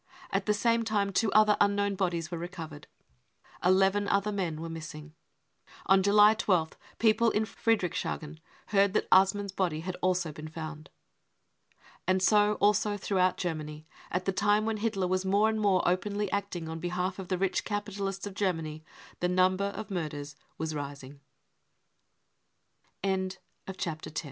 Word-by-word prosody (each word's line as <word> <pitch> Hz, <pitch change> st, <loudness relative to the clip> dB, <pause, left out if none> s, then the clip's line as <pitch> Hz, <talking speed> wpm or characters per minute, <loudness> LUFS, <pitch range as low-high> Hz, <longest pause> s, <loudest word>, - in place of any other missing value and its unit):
At -, -, -1 dB
the 210 Hz, -, +4 dB
same 230 Hz, +2 st, +2 dB
time 205 Hz, -3 st, 0 dB
two 215 Hz, +1 st, +2 dB
other 215 Hz, -1 st, +6 dB
unknown 200 Hz, 0 st, +2 dB
bodies 175 Hz, -4 st, -2 dB
were 170 Hz, -, -3 dB
recovered. 165 Hz, -4 st, -8 dB, 0.8 s
Eleven 195 Hz, +2 st, +3 dB
other 200 Hz, +1 st, +1 dB
men 180 Hz, -6 st, -2 dB
were 165 Hz, -, -5 dB
missing. 155 Hz, -2 st, -8 dB, 0.7 s
On 190 Hz, 0 st, +5 dB
July 205 Hz, +2 st, +6 dB
i -, -, +2 dB
sth 180 Hz, -7 st, +1 dB, 0.2 s
people 230 Hz, +1 st, +4 dB
in 220 Hz, 0 st, 0 dB
Friedrichshagen 180 Hz, -8 st, -2 dB, 0.3 s
heard 200 Hz, -1 st, +3 dB
that -, -, +1 dB
Assmann's 195 Hz, +1 st, +4 dB
body 175 Hz, -5 st, -1 dB
had 180 Hz, +2 st, -4 dB
also 180 Hz, -3 st, +1 dB
been 155 Hz, +1 st, -8 dB
found. 155 Hz, -1 st, -8 dB, 1.2 s
And 185 Hz, 0 st, +3 dB
so 210 Hz, +1 st, +4 dB
also 205 Hz, 0 st, +2 dB
throughout 185 Hz, -2 st, +1 dB
Germany, 155 Hz, -3 st, -4 dB, 0.2 s
at 180 Hz, +1 st, -2 dB
the 195 Hz, -, +2 dB
time 205 Hz, +2 st, +2 dB
when 220 Hz, -1 st, -1 dB
Hitler 210 Hz, -3 st, -1 dB
was 185 Hz, +1 st, 0 dB
more 200 Hz, +3 st, +3 dB
and 220 Hz, 0 st, 0 dB
more 195 Hz, -3 st, +3 dB
openly 200 Hz, +3 st, 0 dB
acting 200 Hz, -5 st, -3 dB
on 160 Hz, 0 st, -5 dB
behalf 180 Hz, +2 st, -2 dB
of 190 Hz, -, -6 dB
the 185 Hz, -, -1 dB
rich 190 Hz, 0 st, 0 dB
capitalists 200 Hz, -2 st, -3 dB
of 205 Hz, -, -6 dB
G 200 Hz, 0 st, +1 dB
195 Hz, 135 wpm, -29 LUFS, 175-205 Hz, 1.2 s, other